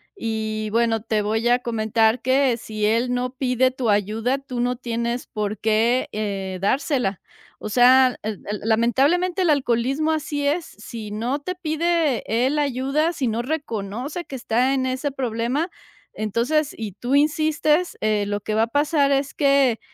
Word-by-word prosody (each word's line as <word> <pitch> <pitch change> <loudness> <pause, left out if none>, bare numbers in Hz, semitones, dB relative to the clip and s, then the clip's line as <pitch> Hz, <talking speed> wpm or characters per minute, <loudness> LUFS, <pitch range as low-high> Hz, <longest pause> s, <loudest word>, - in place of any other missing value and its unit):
y 220 - -3
bueno, 230 0 +1
te 215 -1 0
voy 220 +3 0
a 245 +1 +4
comentar 225 0 +1
que 260 -1 +2
si 215 -2 -3
él 235 +3 +1
no 250 0 -2
pide 255 -1 +1
tu 255 -3 -2
ayuda, 215 +6 +1
tú 260 -3 -7
no 245 +1 0
tienes 235 0 -3
por 210 -1 -3
qué, 225 +3 +2
eh, 195 -3 -3
dársela, 245 - 0 0.4
o - - -6
sea, 255 +2 +5
el 215 -2 -4
el 210 - -3
lamentablemente, 275 - +2
el 335 - +2
alcoholismo 275 +3 +1
así 295 -2 -2
es, 315 +4 0
si 215 0 -9
no 240 +7 -2
te 365 +5 -5
pide 325 -4 0 0.2
él 290 +3 +1
ayuda, 280 +4 0
si 270 -6 -2
no 225 +1 -1
reconoce 255 - -4
que 270 - -8
está 245 +3 +1
en 260 -1 0
ese 260 +3 -2
problema, 255 +5 -1 0.4
entonces 240 +8 0
y 220 -2 -5
tú 245 +6 -1
insistes, 310 +2 +2
eh, 215 -1 +1
lo 205 0 -2
que 215 - -3
va 220 - +3
a 230 - 0
pasar 285 +2 +2
es 275 0 0
que 275 -5 +3
245 Hz, 165 wpm, -22 LUFS, 220-285 Hz, 0.4 s, sea